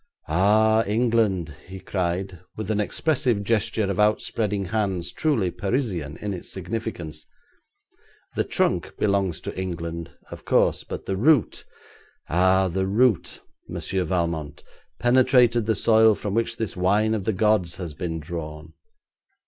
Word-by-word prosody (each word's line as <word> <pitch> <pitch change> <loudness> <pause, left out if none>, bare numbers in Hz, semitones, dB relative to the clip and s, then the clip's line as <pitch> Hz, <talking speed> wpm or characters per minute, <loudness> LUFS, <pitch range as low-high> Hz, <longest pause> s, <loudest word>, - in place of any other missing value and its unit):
'Ah, 110 +7 +4
England!' 105 -7 +1
he 95 +1 -8
cried, 90 0 -3 0.2
with 110 -1 -3
an 105 -1 +1
expressive 125 -3 0
gesture 110 0 0
of 100 0 -2
outspreading 105 -1 +1
hands 95 -3 -2
truly 115 - 0
Parisian 95 - -2
in 105 -1 -4
its 90 - -8
significance. 90 -5 -5 1.1
'The - - 0
trunk - - -1
belongs 100 -4 0
to - - -6
England, 85 -2 -4 0.2
of - - -9
course, - - +2
but - - -7
the 95 - -2
root 140 +2 +2 0.6
ah! 95 +2 +3
the 95 +2 -1
root 105 -2 +1 0.3
Monsieur 95 -1 -2
Valmont, 85 -5 -2 0.3
penetrated 120 -2 +4
the 110 - +2
soil 110 0 +5
from 100 -1 -4
which 115 +1 -1
this 110 -3 -3
wine 100 +4 +2
of 105 -4 -2
the 110 - +2
gods 105 -4 +2
has 85 -5 -6
been 80 0 -4
drawn.' 75 -1 -7
100 Hz, 135 wpm, -24 LUFS, 90-110 Hz, 1.1 s, soil